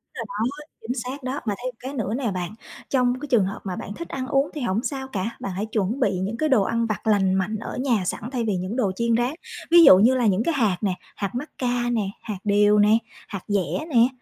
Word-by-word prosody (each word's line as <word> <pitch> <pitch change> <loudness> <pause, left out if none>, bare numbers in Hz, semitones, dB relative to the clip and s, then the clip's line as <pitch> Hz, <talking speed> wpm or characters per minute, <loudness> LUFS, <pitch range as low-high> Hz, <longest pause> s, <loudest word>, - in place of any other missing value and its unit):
Đúng 230 - -4
rồi 210 +4 -1
đó, 295 +1 -9 0.2
chính 230 +2 -3
xác 260 +2 -6
đó! 260 +3 -2
Mà 205 - 0
thêm 255 - -1
một - - -35
cái 265 +2 -6
nữa 220 -6 -2
nè 240 -3 -1
bạn, 180 -1 -3 0.4
trong 250 -1 +2
cái 295 - -6
trường 235 -8 +3
hợp 195 - -4
mà 185 -2 -4
bạn 205 - -6
thích 335 - -7
ăn 260 -1 -4
uống 275 +2 +2
thì 300 - -5
hổng 230 +1 0
sao 265 -1 -3
cả, 225 -1 -4
bạn 195 - -4
hãy 195 +4 -2
chuẩn 220 +3 -1
bị 195 -7 +1
những 205 +5 -2
cái 310 -1 0
đồ 225 -7 +4
ăn 230 +3 0
vặt 215 0 -3
lành 195 -3 +3
mạnh 190 +3 0
ở 225 - -6
nhà 240 -7 +1
sẵn 210 +5 -3
thay 250 -3 -1
vì 205 - +1
những 185 +5 -4
đồ 240 -7 +1
chiên 235 +1 +1
rán. 245 +4 0 0.4
Ví 340 -1 +9
dụ 185 - +10
như 235 +6 +5
là 250 -2 +1
những 205 +1 +3
cái 335 - +1
hạt 220 -10 +2
nè, 200 -4 +1 0.2
hạt 200 +2 -4
mắc 290 +5 -4
ca 245 -1 0
nè, 230 -2 +1 0.2
hạt 210 -4 -5
điều 210 0 +4
nè, 210 +2 +5 0.3
hạt 195 -3 -6
dẻ 205 - -1
nè, 240 -4 +5
230 Hz, 270 wpm, -24 LUFS, 200-255 Hz, 0.4 s, dụ